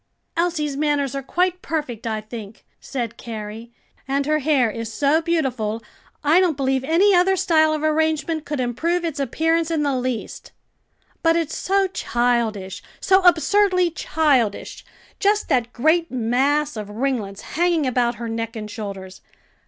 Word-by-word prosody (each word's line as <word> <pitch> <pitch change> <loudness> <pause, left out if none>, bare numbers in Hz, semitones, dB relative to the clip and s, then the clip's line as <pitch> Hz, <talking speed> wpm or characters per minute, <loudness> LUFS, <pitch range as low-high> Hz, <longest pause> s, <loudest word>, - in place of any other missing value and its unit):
"Elsie's 325 -4 0
manners 290 -2 0
are 275 - -3
quite 360 +6 0
perfect, 255 -9 -4
I 220 -1 -2
think," 215 -1 -10
said 240 -4 -5
Carrie; 220 0 -7 0.4
"and 275 +1 0
her 305 +1 +2
hair 275 -6 +2
is 230 +1 -5
so 285 +7 +2
beautiful, 255 -10 -1 0.4
I 310 +5 +5
don't 350 -6 +2
believe 265 -1 0
any 345 +8 +4
other 370 +1 +4
style 315 -3 +3
of 310 0 -2
arrangement 315 0 0
could 295 -2 -4
improve 325 +9 -1
its 310 -3 -3
appearance 325 +5 +1
in 320 -3 0
the 280 -2 +1
least." 250 -2 -4 0.7
"But 330 0 +3
it's 330 -2 -1
so 390 +1 +1
childish, 235 - -1 0.2
so 380 0 +4
absurdly 365 +1 +3
childish! 285 -10 0 0.4
just 415 +1 +1
that 240 -2 +1
great 315 +7 +2
mass 265 +5 +1
of 210 -2 -6
ringlets 215 -4 -2
hanging 340 -2 +2
about 245 -2 +1
her 235 0 -6
neck 225 0 -4
and 210 -1 -6
shoulders. 195 -3 -7
280 Hz, 150 wpm, -22 LUFS, 235-330 Hz, 0.7 s, I